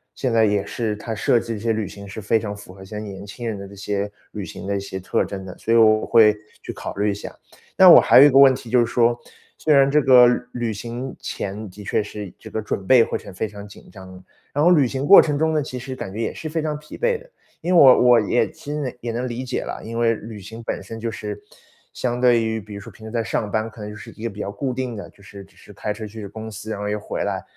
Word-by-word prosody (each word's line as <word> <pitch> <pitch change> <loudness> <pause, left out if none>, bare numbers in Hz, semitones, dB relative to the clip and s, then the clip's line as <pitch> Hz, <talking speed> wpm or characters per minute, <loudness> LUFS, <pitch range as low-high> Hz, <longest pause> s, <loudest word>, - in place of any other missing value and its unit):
现 130 -3 -2
在 110 -1 +4
也 100 -1 0
是， 110 -3 -3
它 110 +2 -6
设 115 +2 +2
计 115 -2 -5
一 - - -8
些 115 +1 0
旅 110 -1 -2
行 100 0 -11
是 100 +3 -8
非 110 +2 +2
常 105 -2 -5
符 100 -2 -13
合 95 - -13
一 - - -12
些 105 +2 -7
年 100 -2 -8
轻 120 +4 -8
人 110 -3 -3
的 100 - -8
这 100 - -13
些 100 +1 -3 0.2
旅 105 -3 -6
行 - - -9
的 100 0 -1
一 - - -2
些 100 -1 -6
特 95 - -1
征 95 -1 -7
的， 90 - -10
所 115 - -1
以 - - +5
我 110 -1 +5
会 110 -3 +6 0.3
去 - - -6
考 - - -7
虑 105 +1 +1
一 - - -2
下。 100 - -8 0.4
那 - - +8
我 - - +11
还 - - +7
有 - - +10
一 - - +7
个 135 - +3
问 135 -2 +7
题 120 - -10
就 125 +2 +4
是 120 - +4
说， 120 0 +1 0.4
虽 155 - +2
然 140 0 +5
这 150 +1 +4
个 125 -2 +7
旅 120 - +1
旅 120 -2 -2
行 120 +5 -6
前 100 +2 -5
的 105 +3 -12
确 100 - 0
是 105 -2 -8
这 110 - -11
个 110 - -3
准 100 -2 -4
备 125 -3 +7
过 - - -3
程 100 - -12
非 95 - -2
常 105 -1 -10
紧 100 - -15
张， 95 -2 -12 0.3
然 145 - +1
后 175 - +6
旅 145 -7 +4
行 135 +3 -3
过 195 - +9
程 145 -2 -1
中 160 +1 +1
呢， 155 - +1
其 130 -2 -6
实 130 +1 -6
感 95 - -6
觉 110 - -4
也 - - -2
是 160 - -7
非 160 +1 -2
常 150 -1 -2
疲 150 - -11
惫 485 -1 +1
的。 - - -18 0.3
因 180 +2 0
为 170 - +7
我 130 -2 +8
我 120 -1 +7
也 115 +3 +1
其 145 - -8
实 140 -5 -4
也 120 -1 -4
能 120 +2 -2
理 125 +1 -5
解 125 - -3
啦， - - -6
因 115 +1 -6
为 115 -1 +3
旅 110 0 -9
行 110 +4 -10
本 - - -4
身 115 0 -8
就 115 - -3
是， 105 -2 -6 0.5
相 120 -1 -2
对 120 -2 +4
于 110 0 -2
比 105 0 -11
如 100 - -7
说 - - -11
平 110 - -12
时 - - -7
在 115 -1 -1
上 105 -1 -2
班， 110 +2 -1
可 110 - -16
能 105 0 -6
就 105 - -9
是 105 - -11
一 110 - -10
个 - - -1
比 100 - -13
较 100 - -4
固 130 +4 -3
定 125 -3 -4
的， 100 - -8
就 100 - -22
是 100 -1 -11
只 95 - -26
是 - - -16
开 105 +1 -4
车 110 +1 -7
去 105 -1 -8
公 110 +2 -8
司， 105 +1 -8
然 - - -3
后 105 - -2
又 105 0 -2
回 - - -4
来， - - -2
110 Hz, 320 characters per minute, -22 LUFS, 105-125 Hz, 0.5 s, 我